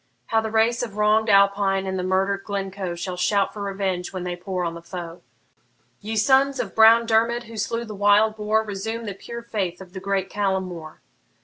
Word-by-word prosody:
How 225 0 +1
the 220 - -3
race 225 +2 +2
of 220 -4 -5
wrong'd 215 +1 +3
Alpine 200 -1 +3
and 190 0 -3
murder'd 195 +1 0
Glencoe 195 -3 -4
Shall 180 +1 -5
shout 195 +2 +1
for 210 - -7
revenge 195 -2 -2
when 185 -2 -5
they 180 -1 -3
pour 180 0 -4
on 165 - -2
the 170 - -9
foe! 170 0 -8 0.8
Ye 220 +2 -5
sons 270 +5 +3
of - - -3
brown 225 +1 +6
Dermid, 230 +1 +2
who 230 -1 -12
slew 230 +3 -2
the 215 - -8
wild 205 +2 +3
boar, 215 +1 +1
Resume 220 +3 -5
the 205 - -4
pure 235 +4 -8
faith 190 -6 -3
of 185 -2 -12
the 190 - -6
great 195 0 -1
Callum 195 -2 -1
More! 170 -4 -9
200 Hz, 200 wpm, -23 LUFS, 190-220 Hz, 0.8 s, brown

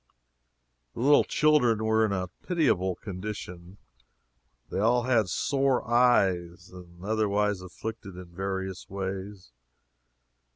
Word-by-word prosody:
The - - -5
little 145 +3 +5
children 125 -8 +2
were 110 0 +3
in 110 - +1
a 90 -2 -2
pitiable 120 - +1
condition 95 -2 -7 0.9
they - - -2
all 120 +3 +3
had 115 -6 +2
sore 135 - 0
eyes, 95 -8 +2
and 90 -1 -13
were 90 +3 -10
otherwise 105 -2 +1
afflicted 100 +2 -8
in 90 0 -9
various 95 +1 -5
ways. 95 -4 -6
100 Hz, 115 wpm, -27 LUFS, 90-115 Hz, 0.9 s, little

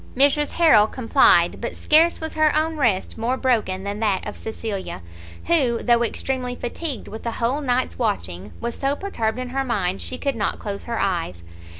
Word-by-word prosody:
Mrs 285 +2 +3
Harrel 265 -12 +5
complied; 230 0 +3
but - - -4
scarce 325 +3 +3
was 320 0 -5
her 310 -1 +3
own 315 +1 +1
rest 230 -7 0
more 245 +3 0
broken 220 -8 0
than 200 +1 -4
that 210 -4 0
of 210 - -5
Cecilia, 210 - -5 0.4
who, 265 -9 +2
though 235 -1 +3
extremely 250 +1 -2
fatigued 260 +3 -4
with 220 - -8
a 230 - -3
whole 250 +7 -1
night's 255 -2 -1
watching, 100 - -2
was 235 0 -3
so 275 +1 -1
perturbed 230 - -2
in 255 0 -4
her 270 +2 -1
mind 195 -7 -1
she 255 - -6
could 275 -1 -2
not 210 -2 -1
close 200 -2 -6
her 235 -1 -3
eyes. 170 - -2
235 Hz, 185 wpm, -22 LUFS, 210-275 Hz, 0.4 s, Harrel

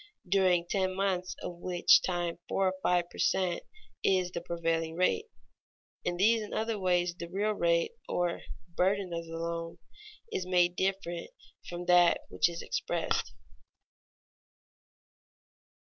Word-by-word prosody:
during 180 -2 +3
ten 185 -1 0
months 190 -2 -1
of 175 - -5
which 175 0 +4
time 175 -2 -2
four 195 -1 +2
or - - -4
five 175 -1 +2
per - - -11
cent, 180 -2 +1 0.4
is 185 -2 +2
the 170 - -4
prevailing 165 -1 -1
rate. 185 - +1 0.8
In 175 - -1
these 220 +4 +4
and 210 - -6
other 220 -1 -1
ways 180 -2 +1
the 170 -1 -8
real 205 +4 0
rate, 170 -4 +1 0.2
or 175 -1 0 0.3
burden 190 0 +1
of 170 0 -4
the 165 0 -6
loan, 165 0 -4 0.5
is 185 - -1
made 175 -1 +3
different 190 - -2 0.4
from 175 0 -5
that 175 -1 +5
which - - +2
is 170 0 -6
expressed. - - -1
180 Hz, 135 wpm, -30 LUFS, 170-190 Hz, 0.8 s, that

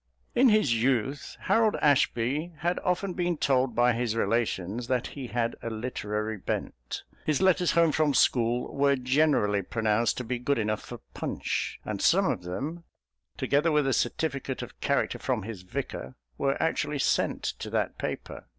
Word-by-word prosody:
In 250 +1 +5
his 145 - +3
youth 135 +3 0
Harold 225 -2 +3
Ashby 145 +3 +1
had 175 +1 0
often 180 +1 -1
been 175 -1 -1
told 130 -4 +1
by 120 +1 +4
his 115 -1 -1
relations 115 0 -1
that 125 -2 0
he 135 -3 -7
had 120 -1 -1
a 115 - -3
literary 110 -2 -3
bent. - - -4 0.2
His 150 -3 +1
letters 185 -2 +3
home 170 -1 +4
from 150 -2 +2
school 120 0 +2
were 140 0 +3
generally 130 -6 +2
pronounced 110 +3 0
to 125 - -3
be 125 +1 -3
good 140 +3 0
enough 110 -1 -1
for - - -9
Punch - - -3
and - - -3
some - - +4
of - - 0
them, 135 - -5 0.5
together 150 +4 +2
with 150 -2 +3
a 135 - +2
certificate 135 +1 -1
of 125 - -11
character 140 - 0
from 125 -6 -1
his 105 -3 -7
Vicar, 80 -7 -5 0.2
were 135 - 0
actually 150 -2 0
sent 135 - +1
to - - -4
that - - -1
paper. - - -5
125 Hz, 165 wpm, -28 LUFS, 115-150 Hz, 0.5 s, In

